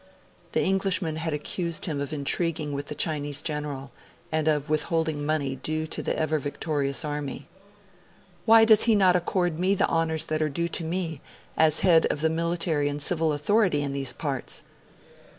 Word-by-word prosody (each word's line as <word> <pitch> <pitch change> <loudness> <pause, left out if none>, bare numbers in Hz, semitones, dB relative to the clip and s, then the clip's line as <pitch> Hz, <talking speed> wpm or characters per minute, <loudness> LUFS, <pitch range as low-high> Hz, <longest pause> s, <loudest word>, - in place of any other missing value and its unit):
The - - +2
Englishman 185 -4 0
had 160 0 -2
accused 165 +3 -2
him 150 -6 -2
of 140 - -4
intriguing 155 +1 -1
with 140 +1 -4
the 150 - -5
Chinese 145 -2 -1
general, 150 -3 -4 0.4
and 155 -1 0
of 150 -1 +1
withholding 155 0 0
money 145 -3 -1
due 155 +4 -2
to 155 - -4
the - - -2
Ever 155 0 0
Victorious 145 0 -2
Army. 145 -2 -4 1.0
'Why 225 0 +7
does 220 -1 +6
he 230 -2 +4
not 185 -3 +4
accord 175 -2 0
me 190 +2 +2
the - - +2
honours 160 -1 0
that 155 0 -2
are 155 - +1
due 170 +4 -2
to 165 - -2
me, 165 -3 -3 0.3
as 155 -1 +4
head 165 -4 +5
of 145 - -1
the 160 0 +2
military 165 -3 0
and 145 0 -4
civil 160 +1 +1
authority 150 +1 +2
in 140 -1 -3
these 135 -2 -2
parts?' 135 -2 -4
155 Hz, 175 wpm, -26 LUFS, 145-170 Hz, 1.0 s, Why